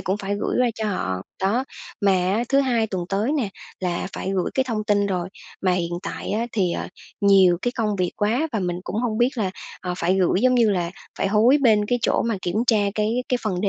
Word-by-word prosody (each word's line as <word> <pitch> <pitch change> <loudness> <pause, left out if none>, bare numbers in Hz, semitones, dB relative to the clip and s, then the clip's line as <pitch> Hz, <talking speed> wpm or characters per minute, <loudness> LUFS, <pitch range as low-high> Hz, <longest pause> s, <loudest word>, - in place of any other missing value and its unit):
cũng 190 - -1
phải 200 0 -3
gửi - - -1
qua 245 - +3
cho 220 - -4
họ. 95 - -2 0.2
Đó, 220 +7 +1 0.4
mà 200 -2 +4
á 185 +4 +1
thứ 275 0 +4
Hai 240 -5 +1
tuần 185 -4 -3
tới 210 +7 0
nè, 270 -9 0 0.3
là 180 -1 -2
phải 190 - -3
gửi 185 - 0
cái 265 - +2
thông 215 -2 -2
tin 205 -2 +2
rồi. 180 -2 -2 0.3
Mà 185 - +3
hiện 175 -1 -1
tại - - -5
á 225 +3 0
thì, 185 -5 +1
ờ, - - -4 0.3
nhiều 190 -4 +5
cái 245 - 0
công 215 -4 0
việc 180 -1 +1
quá 235 +10 +1
và 220 - 0
mình 180 -1 -2
cũng 205 - -4
hông 225 -1 -1
biết 240 +1 +4
là, 195 -4 0 0.3
ờ, 180 -1 -3
phải 175 +2 +2
gửi, 185 +1 +2
giống 255 0 +4
như 235 -3 +4
là, 175 -3 0 0.3
phải 195 - +1
hối 225 +7 +5
bên 210 -4 +4
cái 245 - +1
chỗ - - +2
mà 230 -3 -1
kiểm 175 +3 -2
tra 230 - +4 0.2
cái 225 +4 0
cái 250 - +1
phần 190 -5 -1
đế 200 - +1
205 Hz, 245 wpm, -23 LUFS, 185-230 Hz, 0.4 s, nhiều